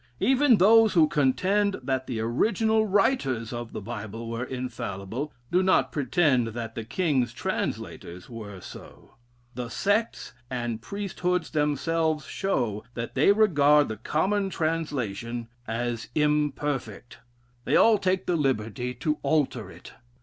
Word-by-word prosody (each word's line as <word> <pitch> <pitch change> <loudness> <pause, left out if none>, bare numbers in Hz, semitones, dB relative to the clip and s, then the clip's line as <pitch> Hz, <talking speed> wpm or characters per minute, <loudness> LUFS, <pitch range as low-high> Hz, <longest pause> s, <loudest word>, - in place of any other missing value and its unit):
Even 265 -2 +4
those 220 +3 +6
who 160 -3 +5
contend 190 +9 +1
that 130 0 -1
the 120 -4 -3
original 220 - +1
writers 185 - +1
of 120 -1 -5
the - - -6
Bible 115 0 -6
were 115 +1 -3
infallible, 125 0 -5 0.2
do 180 - +4
not 190 0 +3
pretend 135 -3 +2
that 115 0 -5
the 115 - -5
king's 130 -1 0
translators 90 -6 -4
were 105 -5 -8
so. - - -12 0.4
The 120 -1 -5
sects 205 - -1 0.2
and 120 -3 -3
priesthoods 180 - -2
themselves 155 +1 0
show 120 - -2
that 115 0 -5
they 145 +8 +5
regard 150 - +4
the 110 - -4
common 195 - 0
translation 125 - -3 0.2
as 115 0 -3
imperfect. 145 -6 -1 0.5
They - - +2
all 225 -2 +6
take 185 0 0
the 180 - +1
liberty 125 -4 -1
to 150 +4 -1
alter 130 -9 0
it. - - -13
140 Hz, 130 wpm, -26 LUFS, 115-180 Hz, 0.5 s, those